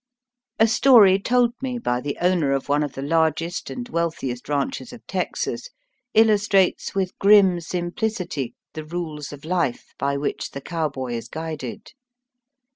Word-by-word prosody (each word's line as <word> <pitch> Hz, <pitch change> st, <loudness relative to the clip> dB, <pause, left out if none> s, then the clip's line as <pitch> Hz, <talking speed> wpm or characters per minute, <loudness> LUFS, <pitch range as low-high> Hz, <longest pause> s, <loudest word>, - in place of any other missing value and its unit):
A 220 Hz, -, +5 dB
story 220 Hz, -5 st, +6 dB
told 240 Hz, +3 st, +2 dB
me 255 Hz, -2 st, -2 dB
by 125 Hz, -, -1 dB
the 145 Hz, +1 st, -4 dB
owner 175 Hz, -6 st, +2 dB
of 135 Hz, -, -2 dB
one 145 Hz, +1 st, +3 dB
of 145 Hz, -3 st, -2 dB
the 135 Hz, -, -6 dB
largest 165 Hz, +3 st, 0 dB
and 245 Hz, -1 st, -6 dB
wealthiest 160 Hz, -, -3 dB
ranches 150 Hz, -, -2 dB
of -, -, -13 dB
Texas -, -, -3 dB, 0.5 s
illustrates 210 Hz, -4 st, +3 dB
with 190 Hz, -2 st, -1 dB
grim 195 Hz, -3 st, +6 dB
simplicity 175 Hz, -, -3 dB, 0.2 s
the 155 Hz, -, -6 dB
rules 155 Hz, -3 st, -5 dB
of 145 Hz, +1 st, -10 dB
life 165 Hz, -8 st, -1 dB
by 140 Hz, 0 st, 0 dB
which 140 Hz, +1 st, -3 dB
the 140 Hz, -, -6 dB
cowboy 140 Hz, -7 st, -3 dB
is 115 Hz, -1 st, -4 dB
guided. 155 Hz, -6 st, -6 dB
170 Hz, 145 wpm, -23 LUFS, 145-200 Hz, 0.5 s, story